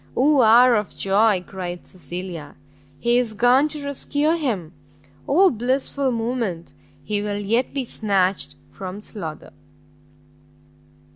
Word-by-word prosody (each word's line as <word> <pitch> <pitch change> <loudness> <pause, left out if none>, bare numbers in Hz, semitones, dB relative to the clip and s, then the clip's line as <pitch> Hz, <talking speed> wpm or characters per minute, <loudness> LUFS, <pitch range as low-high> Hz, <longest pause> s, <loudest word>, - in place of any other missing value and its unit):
"Oh 280 +1 +4
hour 240 +2 +7
of 210 -2 -4
joy!" 195 -1 +2
cried 180 -2 -6
Cecilia, 175 -4 -8 0.4
"he 240 +8 +2
is 230 -3 -2
gone 245 +7 +4
to 300 -1 -4
rescue 285 +2 0
him! 230 - -2 0.5
oh 370 +6 +5
blissful 260 +3 -1
moment! 225 -7 -3 0.3
he 210 -1 -2
will 205 -1 -2
yet 225 +5 0
be 275 -2 -3
snatched 195 -4 0 0.2
from 190 +1 -7
slaughter!" 180 -8 -8
220 Hz, 120 wpm, -22 LUFS, 190-255 Hz, 0.5 s, hour